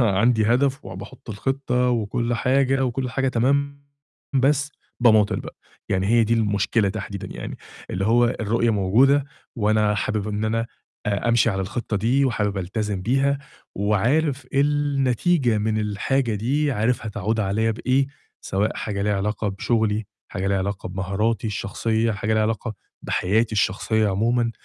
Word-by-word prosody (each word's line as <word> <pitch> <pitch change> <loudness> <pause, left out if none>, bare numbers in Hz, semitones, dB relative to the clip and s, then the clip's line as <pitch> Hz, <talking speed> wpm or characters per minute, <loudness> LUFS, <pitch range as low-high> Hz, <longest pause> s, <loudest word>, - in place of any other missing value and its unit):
أنا 105 -6 +2
عندي 110 +1 +3
هدف 135 +4 +1
وباحط 100 +6 -9
الخطة 125 +3 0
وكل 120 +1 -1
حاجة 135 +2 +2
وكل 125 0 -2
حاجة 135 +3 0
تمام 140 +4 0 0.5
بس 140 +2 +2 0.3
باماطّل 110 -4 +4
بقى، - - -9 0.3
يعني 95 0 0
هي 115 +1 +4
دي 115 - +2
المشكلة 105 -1 +1
تحديدًا 100 -1 -5
يعني، - - -6 0.3
اللي 95 +2 -1
هو 120 +2 +4 0.2
الرؤية 115 +2 +1
موجودة 120 +8 +3 0.3
وأنا 105 -1 +2
حابب 105 +1 -1
إن 105 +1 -2
أنا 115 +1 0 0.4
آآ، 105 +3 0
أمشي 115 0 +4
على 95 -1 -2
الخطة 105 +3 -3
دي 125 +7 +2
وحابب 105 -5 0
ألتزم 100 +1 -3
بيها 135 +5 +1 0.4
وعارف 130 +8 +1
النتيجة 140 -2 +2
من 110 +1 0
الحاجة 110 +4 0
دي، 140 +8 0
عارف 115 0 0
هتعود 110 +1 -1
عليَّ 110 +3 +1
بإيه، 130 +4 +1 0.3
سواء 100 +3 -1
حاجة 100 -2 -3
ليها 105 0 +1
علاقة 105 +2 -1
بشغلي، 110 +1 0 0.2
حاجة 95 0 -3
ليها 100 0 +1
علاقة 95 0 -3
بمهاراتي 100 +5 -1
الشخصية، 110 +2 -1
حاجة 105 +2 -2
ليها 110 - +2
علاقة 110 +1 -2 0.3
بحياتي 110 +5 +1
الشخصية 110 +2 +1
عمومًا، 115 +4 +1
110 Hz, 145 wpm, -23 LUFS, 105-125 Hz, 0.5 s, باماطّل